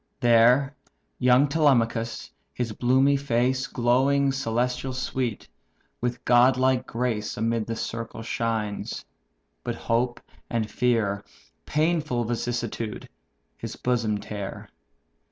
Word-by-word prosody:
There 125 +4 +4 0.4
young 125 +3 +5
Telemachus, 120 -7 +1 0.2
his 120 -2 -2
bloomy 130 +5 +3
face 130 0 0
Glowing 135 +3 +2
celestial 125 0 -1
sweet, 125 -3 -3 0.5
with 125 +1 -3
godlike 130 +1 +4
grace 115 -3 -2
Amid 115 0 0
the 115 - -2
circle 115 0 -5
shines: 110 -3 -3 0.6
but - - -3
hope 120 +1 0 0.3
and 115 -2 -1
fear 110 -5 +1 0.4
(Painful 155 -5 +1
vicissitude!) 115 -1 -3 0.5
his - - -6
bosom 115 -4 0
tear. 100 -1 -7
120 Hz, 100 wpm, -25 LUFS, 115-130 Hz, 0.6 s, young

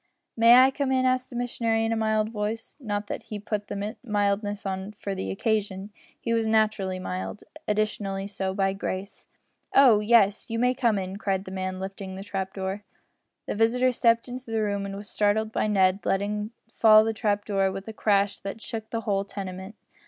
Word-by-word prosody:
"May 230 +1 +7
I 260 +1 +7
come 270 0 -1
in?" 260 0 +2
asked 255 0 +1
the 245 - -10
missionary 230 -2 0
in 225 - 0
a - - +1
mild 220 -1 +1
voice 220 +1 -4
not 210 -5 -3
that - - -5
he 210 - -7
put 205 0 -4
the 205 +2 -4
mildness 205 -2 -1
on 190 +1 -4
for 200 -1 -5
the 95 - -4
occasion. 200 - -1 0.3
He 230 - -1
was 225 -1 +1
naturally 215 -4 +1
mild 185 +2 -5 0.2
additionally 205 -2 -1
so 195 -1 -3
by 195 -1 +1
grace. 195 0 -5 0.5
"Oh! 250 -6 +7
yes 210 +1 +3
you 230 - -2
may 250 +2 +3
come 235 -5 +1
in," 190 0 -4
cried 195 -2 -1
the 185 - -8
man, 185 0 -3
lifting 190 0 -6
the 195 - -7
trap 195 -1 -4
door. 190 +1 -4 0.6
The - - -3
visitor 240 +4 +3
stepped 230 -1 +2
into 250 0 -8
the 220 -1 0
room 200 -1 -1
and 195 - -6
was 205 +1 -7
startled 215 +2 +1
by 215 - 0
Ned 195 -1 +2
letting 210 +2 -1 0.2
fall 215 -2 +6
the 225 0 -1
trap 205 -2 0
door 195 -2 +1
with 195 +2 -7
a 220 - -6
crash 200 -2 +1
that 195 +3 -6
shook 220 -1 -6
the 230 - -2
whole 200 -2 0
tenement. 190 0 -7
210 Hz, 195 wpm, -26 LUFS, 195-225 Hz, 0.6 s, May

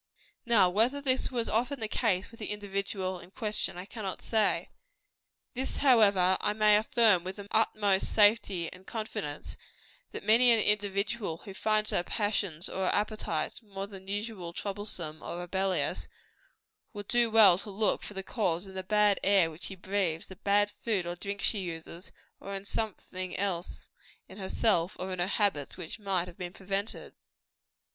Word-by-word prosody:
Now, 220 -6 +5
whether 225 +10 +2
this 265 -2 +1
was 240 -3 -1
often 250 +5 0
the 220 - -2
case 205 -4 0
with 230 - -15
the 210 - -5
individual 195 -2 -3
in 175 - -13
question, 210 -2 -2
I 180 - -6
cannot 200 -3 -6
say. 220 -3 +1 0.8
This, 260 +2 -3
however, 205 -9 +4
I 210 - +1
may 210 0 +5
affirm 215 -3 +4
with 185 +1 -5
the 200 -1 -9
utmost 205 -3 +2
safety 205 -5 +3
and 185 +1 -16
confidence 215 -10 -5 0.5
that - - -7
many 230 +4 +6
an 230 - +5
individual 205 -3 0
who 195 - -8
finds 215 +1 +1
her - - +2
passions 195 -4 -1
or 190 - -2
her - - +3
appetites 205 -7 -2
more 195 -3 -6
than 195 -2 -12
usually 205 -3 -4
troublesome 190 -6 -5
or - - -6
rebellious, 190 +2 -1 0.9
would 205 -2 -7
do 240 -1 +3
well 210 -5 +7
to 205 - -8
look 205 +2 0
for 205 - -9
the 195 - -4
cause 185 -5 -1
in 190 - -11
the 190 - -3
bad 210 +1 +3
air 190 -4 +4
which 160 +3 -6
she 195 - -6
breathes, 185 -3 -1
the 190 - -11
bad 205 +1 +2
food 205 -6 -2
or 175 0 -3
drinks 200 +2 -3
she 215 - +2
uses, 170 -1 -7 0.3
or 200 0 -6
in 195 0 -5
something 185 -4 -3
else 185 -3 -3 0.4
in - - -12
herself 190 -2 +1
or 185 +1 -4
in 185 - -5
her 175 - +1
habits 195 -9 0
which 160 - -7
might 190 -4 -1
have 180 - -12
been 175 -1 -5
prevented. 200 +2 -3
200 Hz, 170 wpm, -30 LUFS, 185-215 Hz, 0.9 s, well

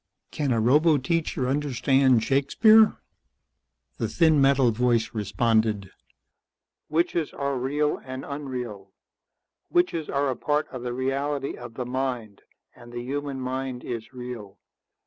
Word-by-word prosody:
Can 145 -3 -1
a 115 - +2
roboteacher 145 +2 +2
understand 135 -3 +2
Shakespeare?" 215 - +5 1.0
The 115 - 0
thin 155 +5 +3
metal 135 -3 +4
voice 120 0 +1
responded. 105 -1 0 1.0
"Witches 165 0 0
are 140 -1 -2
real 145 +4 0
and 130 0 -7
unreal. 125 -9 -6 0.8
Witches 350 - +1
are 140 -1 0
a - - -3
part 150 +3 0
of 130 - -7
the 125 0 -4
reality 135 +2 -2
of 120 -2 -10
the 125 - -4
mind, 125 -5 -3 0.3
and 120 -1 -14
the 120 0 -5
human 140 +1 -4
mind 130 -1 -4
is 115 -1 -6
real. 125 -6 -8
130 Hz, 125 wpm, -25 LUFS, 120-145 Hz, 1.0 s, Shakespeare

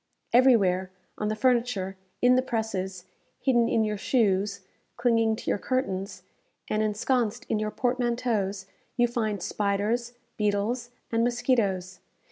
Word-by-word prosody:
Everywhere, 200 -8 +4 0.3
on 210 - -1
the 215 - 0
furniture, 235 -6 +1 0.3
in 250 0 +6
the 255 - +4
presses, 195 -7 -3 0.3
hidden 240 -4 +3
in 225 - +2
your 210 -1 -1
shoes, 200 -4 +1 0.4
clinging 230 -2 +2
to - - -11
your - - 0
curtains, 195 -7 -2 0.4
and 215 - 0
ensconced 235 +2 0
in 215 - +1
your 215 0 -1
portmanteaus, 235 -5 -1 0.3
you 240 -1 +4
find 215 -5 -2
spiders, 210 +4 -1 0.2
beetles, 210 +4 0 0.2
and 230 0 +2
mosquitoes. 205 -7 0
220 Hz, 125 wpm, -27 LUFS, 200-240 Hz, 0.4 s, in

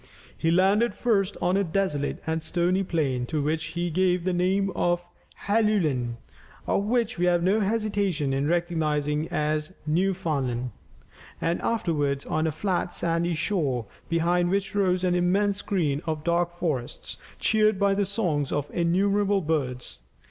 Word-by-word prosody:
He 165 - 0
landed 195 +7 +3
first 205 -5 +1
on 180 +1 +2
a 200 - +2
desolate 160 -5 -1
and 160 0 -1
stony 175 +3 +1
plain, 140 -9 -1
to 155 - -1
which 155 +2 0
he 175 0 -1
gave 180 +1 +2
the 185 0 0
name 190 +2 +1
of 175 -1 0 0.4
Helluland, 185 - +1 0.5
and 200 +1 0
which 235 -4 0
we 180 - +2
have 175 -1 +3
no 195 +4 +3
hesitation 200 -8 0
in 135 +2 0
recognizing 155 -3 0
as 150 +3 -1
Newfoundland, 150 -8 0 0.7
and 170 +1 -1
afterwards 145 -10 0
on 155 +1 0
a - - 0
flat 180 +2 -2
sandy 170 0 0
shore 145 - 0 0.2
behind 175 +1 +2
which 195 +1 -1
rose 185 -3 +1
an 180 -1 +2
immense 195 +3 +2
screen 160 -9 -1
of 155 -1 -2
dark 170 +1 +1
forests, 155 -8 -4 0.2
cheered 215 -2 +3
by 200 0 +3
the 200 +1 +1
songs 180 -8 -1
of 145 0 -2
innumerable 195 +3 +2
birds. 140 -6 -2
175 Hz, 150 wpm, -26 LUFS, 155-195 Hz, 0.7 s, landed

